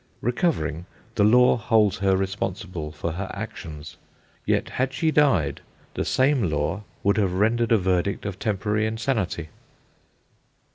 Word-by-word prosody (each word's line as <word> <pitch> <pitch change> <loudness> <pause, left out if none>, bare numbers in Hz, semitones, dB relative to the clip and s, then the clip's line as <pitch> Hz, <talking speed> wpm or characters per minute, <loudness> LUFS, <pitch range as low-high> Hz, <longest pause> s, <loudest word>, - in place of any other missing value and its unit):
Recovering, 105 - -1 0.3
the 105 - +2
Law 125 +5 +5
holds 110 -4 +2
her 95 -1 +3
responsible 95 -4 -3
for 80 +2 -4
her 95 +4 -5
actions; 75 -1 -8 0.5
yet, - - +1
had 130 +1 -1
she 160 +5 +1
died, 115 - +2 0.3
the - - -2
same 130 - +2
Law 75 +6 -1 0.2
would 100 +2 +2
have 95 -4 +1
rendered 115 +5 +1
a 115 - +6
verdict 95 +1 0
of 100 -2 -5
temporary 105 +1 0
insanity. 110 - -2
100 Hz, 135 wpm, -24 LUFS, 90-115 Hz, 0.5 s, a